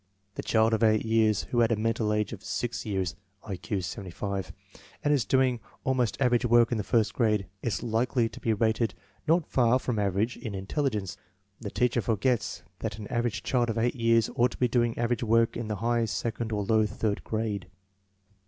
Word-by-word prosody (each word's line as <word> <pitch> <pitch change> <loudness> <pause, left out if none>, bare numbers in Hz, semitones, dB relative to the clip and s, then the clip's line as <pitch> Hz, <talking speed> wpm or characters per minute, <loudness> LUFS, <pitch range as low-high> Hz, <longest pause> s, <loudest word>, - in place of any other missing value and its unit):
The - - -4
child 110 0 +2
of 110 - +1
8 110 -1 +3
years 110 -2 +3
who 120 - +2
has 115 -1 +4
a 115 - +2
mental 110 0 0
age 105 +1 0
of 100 - -9
6 120 0 -3
years 95 -4 -1 0.3
(I 100 -3 -4
Q 90 +3 -3
75) 95 0 -4 0.5
and 145 - +3
is 135 -6 +2
doing 130 -2 +2 0.2
almost 130 -4 0
average 125 -2 +3
work 120 -1 +4
in 115 - 0
the - - -1
first 110 0 +1
grade, 105 -5 +1 0.2
is 115 -5 -2
likely 120 +1 +1
to - - -10
be 115 - 0
rated 110 +1 +1 0.3
not 165 0 +3
far 125 -1 +3
from 125 -4 -2
average 100 +4 0
in 110 -5 -6
in 95 0 -5
telligence. 105 - -2 0.4
The 105 - -5
teacher 120 +4 +1
forgets 115 0 0 0.2
that 90 - -4
an 105 - -7
average 120 -2 -1
child 120 -2 +1
of 115 - -2
8 120 +2 +2
years 115 -2 +3
ought 120 +1 +3
to - - -11
be 125 - +2
doing 120 -1 +1
average 120 0 0
work 115 0 +3
in 115 -2 -4
the 105 - -2
high 115 +3 +1
second 115 +1 -3
or 105 -1 -1
low 110 +1 +3
third 105 0 -2
grade. 110 -4 -2
115 Hz, 200 wpm, -28 LUFS, 105-120 Hz, 0.5 s, has